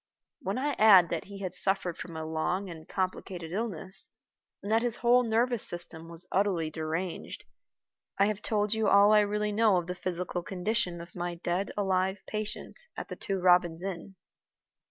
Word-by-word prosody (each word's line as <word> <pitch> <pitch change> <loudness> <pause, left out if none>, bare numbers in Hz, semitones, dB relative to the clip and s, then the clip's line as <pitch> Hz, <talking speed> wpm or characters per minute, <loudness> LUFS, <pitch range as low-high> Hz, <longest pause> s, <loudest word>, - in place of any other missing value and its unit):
When 205 -7 -3
I 290 +3 0
add 195 -5 +7
that - - -3
he 200 0 -10
had 185 -2 -4
suffered 190 -2 +1
from 165 -2 -8
a 160 - -4
long 175 +4 -2
and 160 -1 -11
complicated 185 -3 -4
illness, 200 - +4 0.5
and 200 - -4
that 225 +1 +4
his 240 -1 0
whole 245 +1 +4
nervous 235 0 +1
system 165 -1 -3
was 170 +1 -8
utterly 185 -5 0
deranged, 160 +3 -4 0.7
I 195 - +4
have 210 0 -2
told 210 -1 0
you 220 -1 0
all 200 +1 +6
I 210 - +7
really 210 0 0
know 210 -2 +3
of 175 - -1
the 180 - -4
physical 180 0 -4
condition 180 -1 -2
of 170 0 -12
my 175 -1 -3
dead 175 +3 -2
alive 190 -1 0
patient 215 0 -4 0.2
at - - -6
the - - -5
Two 195 - -3
Robins 180 -2 +3
Inn. 195 0 -6
190 Hz, 175 wpm, -29 LUFS, 175-210 Hz, 0.7 s, add